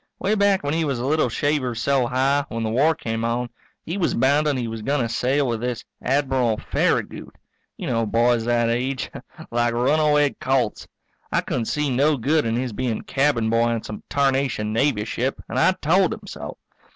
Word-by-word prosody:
Way 200 - 0
back 200 -3 +2
when 145 +1 -1
he 165 0 +1
was 140 -4 -1
a 120 - -3
little 150 -2 +2
shaver 130 -1 0
so 125 +1 +1
high, 135 +3 +1
when 115 0 -3
the 110 - -1
war 150 +7 +3
came 115 -5 -3
on, 120 +1 -1 0.3
he 175 +5 -3
was 175 - +1
bounden 140 +3 +2
he 120 -2 -2
was 110 -1 -5
going 140 +5 0
to 120 - 0
sail 135 +4 +1
with 115 -2 -2
this 125 -1 -3 0.2
Admiral 130 -4 +1
Farragut. - - -1 0.4
You - - -6
know 115 -1 0
boys 115 +1 +2
that 120 -1 +2
age 125 +3 -2 0.4
like 120 0 +1
runaway 150 +3 +3
colts. 130 -4 0 0.4
I - - +2
couldn't 120 - -2
see 150 +3 -1
no 145 +3 +3
good 145 +3 +1
in 115 - 0
his 125 -1 -2
being 120 -1 -2
cabin 135 -5 +1
boy 115 +1 +3
on 115 -1 -1
some 105 - -7
tarnation 135 -6 0
Navy 115 -3 +1
ship 130 +3 -2
and - - -2
I 185 - +4
told 185 +4 +2
him 215 -2 -15
so. - - -8
130 Hz, 195 wpm, -23 LUFS, 115-145 Hz, 0.4 s, I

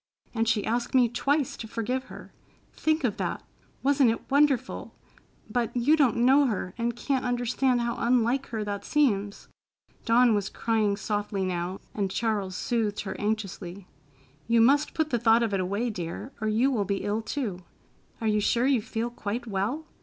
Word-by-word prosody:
And 225 -1 +1
she 215 -2 +1
asked 240 +3 -1
me 250 -2 +6
twice 275 +4 0
to 225 - -7
forgive 250 +4 -2
her. - - -12 0.4
Think 315 -1 0
of 230 -6 0
that! - - -3 0.4
Wasn't 275 -2 +4
it 225 +4 -4
wonderful? 285 -2 +1 0.5
But 235 +2 -1
you 270 +6 +4
don't 280 -7 +3
know 275 +2 +5
her 190 -5 -3
and 235 0 -2
can't 265 +2 -1
understand 245 +1 +1
how 235 0 -1
unlike 245 +2 +2
her 220 -3 -3
that 205 -1 -4
seems." 205 -9 0 0.6
Dawn 235 0 +4
was 205 -1 0
crying 215 -3 0
softly 205 -2 -2
now, 180 +1 -3
and 200 -2 -1
Charles 205 -3 -1
soothed 220 -3 -1
her 195 - -5
anxiously. 200 -3 -3 0.6
"You 230 0 +4
must 280 +6 +4
put 315 -1 0
the 240 - +1
thought 230 0 +4
of 220 -3 -1
it 195 - +1
away, 200 +6 -1
dear, 180 +6 -6
or 215 - 0
you 230 +6 +2
will 225 -6 +1
be 195 0 -2
ill, 205 +2 -1
too. 220 -5 -3 0.6
Are 225 - -2
you 210 -1 +2
sure 235 +4 +2
you 265 -4 +3
feel 230 +2 -3
quite 235 +1 -4
well? 220 +9 -2
230 Hz, 175 wpm, -27 LUFS, 205-250 Hz, 0.6 s, me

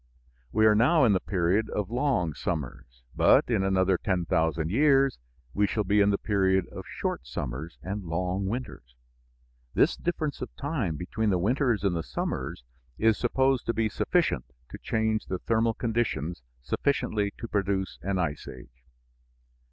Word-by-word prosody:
We 110 +1 +3
are 110 - +7
now 130 +9 +4
in 110 - +4
the 95 - +2
period 95 +4 0
of 105 0 -3
long 120 - +1
summers, 60 -7 -5
but - - +5
in 95 - +2
another 95 -1 +2
10,000 80 -3 0
years 135 - +3 0.3
we 105 0 +2
shall 105 +2 -1
be 105 +2 +3
in 100 - +4
the 100 - +2
period 95 -3 +1
of - - -8
short 65 - -4
summers 65 +7 -5
and 100 +4 -4
long 90 +3 -1
winters. 100 - -6 0.8
This - - +4
difference 155 -4 -3
of - - -4
time 135 - -2
between 105 +7 -2
the 95 - +2
winters 120 +3 +1
and 95 -3 +1
the 85 - -1
summers - - -4 0.3
is 110 0 +3
supposed 130 +1 +1
to 115 - 0
be 110 -1 +1
sufficient 125 - 0 0.3
to - - -8
change 110 -1 -1
the 95 - -2
thermal 115 +3 +1
conditions 110 - -1 0.2
sufficiently 105 - 0
to 115 - -6
produce 100 -2 -1
an 95 +1 -1
ice 75 -5 -2
age. 60 0 -12
100 Hz, 160 wpm, -27 LUFS, 85-115 Hz, 0.8 s, are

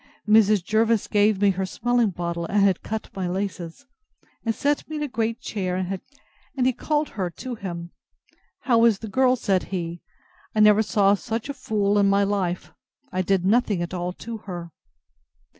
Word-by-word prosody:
Mrs. 210 -3 +5
Jervis 220 +2 +2
gave 205 -1 +2
me 200 -1 +4
her 190 0 -2
smelling 240 +2 +1
bottle, 170 -2 -3
and 200 +2 +2
had 195 -3 +3
cut 220 0 -5
my 190 -2 -2
laces, 185 +3 -4 0.6
and 225 -1 -1
set 290 +1 0
me 310 - -5
in 300 - -2
a - - -1
great 230 -2 -2
chair, 185 -6 -3 0.8
and 255 -2 +1
he 260 - +3
called 300 +4 -1
her 185 -4 -3
to 250 +9 -7
him: 175 -6 -6 0.7
How 235 -3 +3
is 225 -4 +4
the 220 - -7
girl? 255 +4 +3
said 195 -6 0
he: 170 -2 -4 0.5
I - - +1
never 210 0 +6
saw 205 -3 +3
such 225 +4 -3
a - - -2
fool 210 -6 0
in 200 -1 +4
my 200 0 +3
life. 195 -3 -1 0.4
I 185 - 0
did 185 0 +1
nothing 205 -3 +2
at 175 - -6
all 180 0 -2
to 230 +4 -7
her. 175 -5 -8
205 Hz, 180 wpm, -24 LUFS, 185-230 Hz, 0.8 s, never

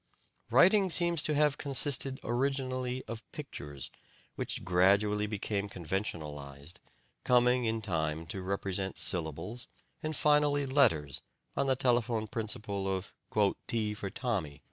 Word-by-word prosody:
Writing 195 +1 +5
seems 170 -2 +3
to 150 - 0
have 150 -1 +2
consisted 135 -1 +3
originally 130 0 -1
of 115 -1 -6
pictures, 70 -2 -8 0.4
which - - -3
gradually 100 +4 +3
became 105 -1 -2
conventionalized, 80 -6 -5 0.4
coming 125 0 +3
in 110 0 -1
time 80 -4 -1
to 95 +4 -5
represent 95 0 -2
syllables, 90 - -1 0.3
and 155 0 -3
finally 150 -1 +3
letters 110 - +2 0.3
on 140 - 0
the 130 - +3
telephone 120 -3 +1
principle 105 -3 -4
of 95 0 -3 0.5
"T 110 -2 +1
for 100 -2 -5
Tommy." 95 - -3
110 Hz, 120 wpm, -31 LUFS, 95-130 Hz, 0.5 s, Writing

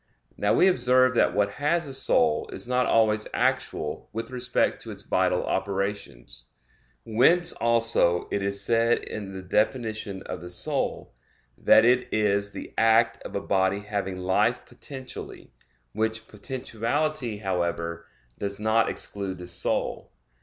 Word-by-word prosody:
Now - - +1
we 185 - +5
observe 130 -7 +3
that - - +2
what 100 0 +1
has 165 +2 +1
a 135 - -5
soul 230 - +2
is - - -6
not 125 0 +1
always 110 -1 +2
actual - - -1
with 115 +4 -5
respect 125 0 0
to - - -8
its - - -8
vital - - +1
operations; 95 -12 -4 0.6
whence 135 +11 +3
also 115 -7 +2
it 100 - -1
is 100 0 +2
said 115 0 +2
in 100 -2 -6
the 95 -1 -8
definition 110 -1 -1
of 90 - -6
the 90 - -8
soul, 90 - -2 0.4
that 110 - +5
it 125 +1 +2
is 100 -1 +1
"the - - -9
act 115 +1 +3
of - - -8
a - - -1
body 95 +1 +1
having 100 -2 -4
life 95 +1 +1
potentially"; 130 -2 -9 0.4
which 110 +1 -2
potentiality, 125 +2 -3
however, 85 -3 -3 0.3
"does 100 0 -4
not 110 +1 +2
exclude 100 -2 -3
the 90 - -8
soul." 90 0 -1
110 Hz, 140 wpm, -26 LUFS, 95-125 Hz, 0.6 s, we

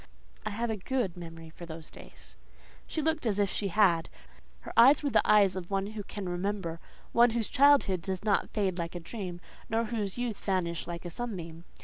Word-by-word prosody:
"I - - 0
have 225 +2 -2
a 220 - -2
good 210 -2 -1
memory 165 -2 -9
for 170 +1 -10
those 160 -1 -9
days." - - -13 0.5
She 315 - -2
looked 315 -4 0
as 205 -3 +1
if 200 -2 +2
she 205 - -1
had. 180 -4 +3 0.5
Her - - -9
eyes 270 +6 +7
were 285 - 0
the - - +5
eyes 200 -3 +5
of 180 -2 -5
one 195 -1 0
who 215 +1 -5
can 200 -1 -6
remember; 175 -2 -2 0.3
one 240 +1 +6
whose 230 -1 -1
childhood 270 -10 +4
does 190 +3 -4
not 205 -2 +2
fade 190 -4 -1
like 170 +1 -4
a - - -3
dream, 180 0 -6 0.3
nor 225 +1 +1
whose 215 -4 -3
youth 240 -4 -2
vanish 175 -4 -1
like 175 0 -6
a 175 - -5
sunbeam. 170 -7 -6
195 Hz, 205 wpm, -30 LUFS, 175-225 Hz, 0.5 s, eyes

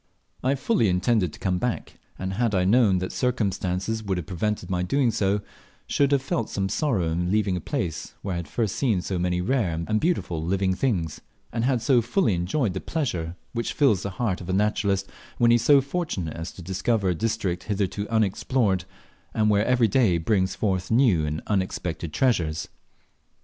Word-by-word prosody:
I 130 +2 +2
fully 135 - +2
intended 90 0 +2
to - - -13
come 90 -2 0
back; 125 +2 -3 0.2
and 95 0 -3
had 110 0 +1
I 90 -1 +2
known 105 -2 +4
that 95 0 -3
circumstances 105 -3 -1
would 100 -3 -2
have 90 - -4
prevented 105 +5 -2
my 90 -2 -1
doing 120 +7 +2
so, 100 -1 +1 0.4
shoed 140 0 +1
have 140 -2 +2
felt 115 -4 -1
some 95 -1 -1
sorrow 110 - 0
in 90 +2 -1
leaving 100 -2 +1
a 90 - -3
place 100 - -3
where 95 - -2
I - - -2
had 85 -3 -5
first 110 +4 -1
seen 110 -10 +1
so 95 -1 -2
many 90 0 0
rare 90 -7 0
and 110 0 +1
beautiful 90 - 0
living 95 +2 +1
things, 90 - -1 0.3
and 115 0 0
bad 125 -3 +1
so 125 -1 +4
fully 120 - +1
enjoyed 90 - 0
the 95 - -4
pleasure 90 - -2 0.2
which 115 -1 -2
fills 130 - +3
the 100 - -3
heart 105 -7 -1
of 90 - -8
the 95 - -1
naturalist 100 -1 +1 0.3
when 120 -1 +4
he - - +7
is - - -2
so 140 +3 +6
fortunate 140 - -3
as 80 +1 -5
to 90 - -10
discover 95 +3 0
a - - +2
district 105 -2 -2
hitherto 100 0 -2
unexplored, 105 -2 +1 0.5
and 105 -1 +3
where 105 +1 +2
every 125 -2 +4
day 105 -5 +3
brings 95 +2 +1
forth 95 -4 -1
new 110 - +3
and 75 +1 -3
unexpected 90 -4 -2
treasures. 85 - 0
100 Hz, 190 wpm, -25 LUFS, 90-120 Hz, 0.5 s, he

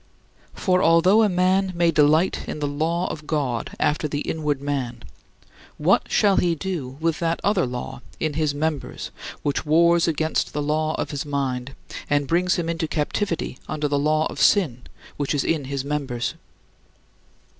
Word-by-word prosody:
For 185 -1 +2
although 180 +5 +5
a 215 - +4
man 185 +1 +2
may 170 -1 +3
"delight 155 +3 +3
in - - -4
the 150 -1 -2
law 160 +5 -1
of 150 -1 -8
God 135 -7 -2
after 150 +1 +1
the 145 0 -3
inward 150 -4 -1
man," 135 -5 -3 0.7
what - - +2
shall 200 -2 +4
he 170 -1 +2
do 150 -7 -4
with 165 -1 0
that 165 0 0
other 200 -8 +2
"law 125 +1 -6 0.2
in 155 -2 -1
his 150 -1 0
members 155 -1 -3 0.3
which 145 - 0
wars 170 +2 +4
against 160 -1 0
the 150 - -1
law 155 +1 0
of - - -3
his 145 -2 -3
mind, 135 -3 -3 0.3
and 145 -1 +2
brings 180 +3 +2
him 175 -2 -2
into 165 -1 -1
captivity 160 -1 -2
under 150 -1 -1
the 145 0 0
law 155 +2 +2
of - - -4
sin, 150 - +3 0.4
which 145 0 -1
is 140 - +1
in 155 -4 0
his 135 0 -3
members"? 140 -5 -2
155 Hz, 165 wpm, -23 LUFS, 145-170 Hz, 0.7 s, although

